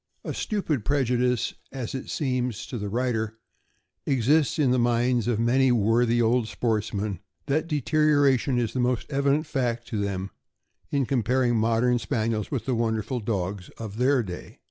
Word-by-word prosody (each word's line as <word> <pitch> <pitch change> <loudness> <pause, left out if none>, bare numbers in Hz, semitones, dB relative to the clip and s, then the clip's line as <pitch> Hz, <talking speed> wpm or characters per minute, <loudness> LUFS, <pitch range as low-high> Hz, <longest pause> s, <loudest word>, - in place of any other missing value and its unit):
A - - -4
stupid 165 - -2
prejudice, 125 -2 +1 0.2
as 130 -4 -5
it 130 - -5
seems 125 -5 -2
to 120 - -5
the 105 0 -4
writer, 110 -1 -1 0.7
exists 140 +2 +2
in 140 -5 +3
the 125 - +3
minds 120 0 +2
of 120 -3 +1
many 125 +3 +3
worthy 120 +1 +3
old 115 0 +2
sportsmen, 105 -4 -2 0.3
that 150 +3 0
deterioration 145 -3 +2
is 115 -3 -1
the 130 - -2
most 125 -1 +1
evident 140 +2 +1
fact 120 -5 -2
to 105 -3 -2
them 100 -1 -3 0.6
in 140 -2 +1
comparing 125 -1 +1
modern 115 +2 +2
Spaniels 110 -4 -1
with 135 -5 -3
the 130 - 0
wonderful 115 +1 -1
dogs 100 -3 -3
of 110 -2 -7
their 130 +1 +3
day. 90 -3 -8
120 Hz, 155 wpm, -26 LUFS, 110-130 Hz, 0.7 s, in